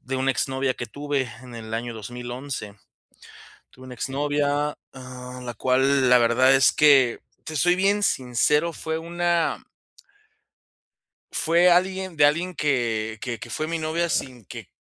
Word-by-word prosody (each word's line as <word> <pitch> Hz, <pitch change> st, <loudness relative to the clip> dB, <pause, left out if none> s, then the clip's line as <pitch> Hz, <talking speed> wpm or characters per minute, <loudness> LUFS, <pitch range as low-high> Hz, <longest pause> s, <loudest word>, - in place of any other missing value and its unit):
de 130 Hz, +1 st, -4 dB
una 135 Hz, +1 st, +1 dB
exnovia 130 Hz, 0 st, -1 dB
que 120 Hz, -, -6 dB
tuve 145 Hz, -2 st, -3 dB
en 125 Hz, -1 st, -11 dB
el 110 Hz, -1 st, -9 dB
año 120 Hz, +1 st, -3 dB
2011. 120 Hz, 0 st, -7 dB, 1.0 s
Tuve 130 Hz, 0 st, -15 dB
una 130 Hz, -, -9 dB
exnovia, 145 Hz, +2 st, -1 dB, 0.2 s
ah, 125 Hz, -1 st, -9 dB
la 120 Hz, -1 st, -5 dB
cual, 130 Hz, +2 st, +2 dB
la 125 Hz, -, +7 dB
verdad 125 Hz, +3 st, +4 dB
es 135 Hz, -1 st, +5 dB
que, 135 Hz, -5 st, +5 dB, 0.3 s
te 155 Hz, -, -6 dB
soy 175 Hz, +4 st, +3 dB
bien 200 Hz, +2 st, +1 dB
sincero, 150 Hz, +5 st, +1 dB
fue 160 Hz, 0 st, -4 dB
una 170 Hz, 0 st, -1 dB, 1.7 s
fue 170 Hz, +2 st, +3 dB
alguien 185 Hz, 0 st, +1 dB
de 145 Hz, -, +5 dB
alguien 170 Hz, +5 st, +1 dB
que 115 Hz, -8 st, -1 dB
que 120 Hz, -3 st, -4 dB
que 120 Hz, -, -9 dB
fue 155 Hz, -, -3 dB
mi 165 Hz, 0 st, -2 dB
novia 160 Hz, +2 st, -1 dB
sin 125 Hz, -8 st, -3 dB
que -, -, -10 dB
135 Hz, 150 wpm, -24 LUFS, 125-160 Hz, 1.7 s, la